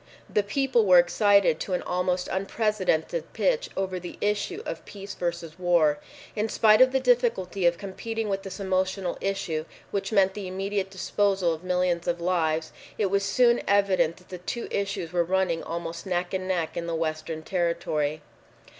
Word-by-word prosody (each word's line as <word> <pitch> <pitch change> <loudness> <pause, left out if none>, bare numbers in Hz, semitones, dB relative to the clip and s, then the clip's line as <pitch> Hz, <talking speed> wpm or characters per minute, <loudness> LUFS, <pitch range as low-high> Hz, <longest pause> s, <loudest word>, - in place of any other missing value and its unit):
The 210 - +2
people 240 +3 +1
were 185 -3 +6
excited 200 0 +4
to 190 - -3
an 180 - -1
almost 180 0 -1
unprecedented 195 - -1
pitch - - +1
over 190 -1 -1
the 175 0 -8
issue 210 - -1
of - - -5
peace 200 -1 -9
versus 170 -2 -4
war. 170 -5 +3 0.4
In 215 +1 -1
spite 215 +1 +5
of 255 0 +7
the 265 - +2
difficulty 230 -8 +2
of 170 0 +2
competing 220 +3 -4
with 195 -1 -1
this 195 0 -8
emotional 190 -1 -1
issue 195 -5 -2 0.3
which 195 0 -2
meant 195 -3 +4
the 200 -2 -6
immediate 195 +1 -2
disposal 195 -2 +1
of 160 +2 -8
millions 180 -1 0
of 175 0 0
lives, 165 -3 0 0.3
it 200 -3 0
was 200 0 +2
soon 235 +3 +3
evident 190 -5 +3
that 180 - -20
the 180 - -7
two 235 +6 -4
issues 195 -4 -2
were 175 -1 +3
running 180 -1 0
almost 170 +1 -5
neck 175 0 -1
and 185 0 -2
neck 170 -4 -1
in 170 0 -3
the 165 - -2
Western 160 0 -3
territory. 160 -4 -1
185 Hz, 170 wpm, -26 LUFS, 170-200 Hz, 0.4 s, of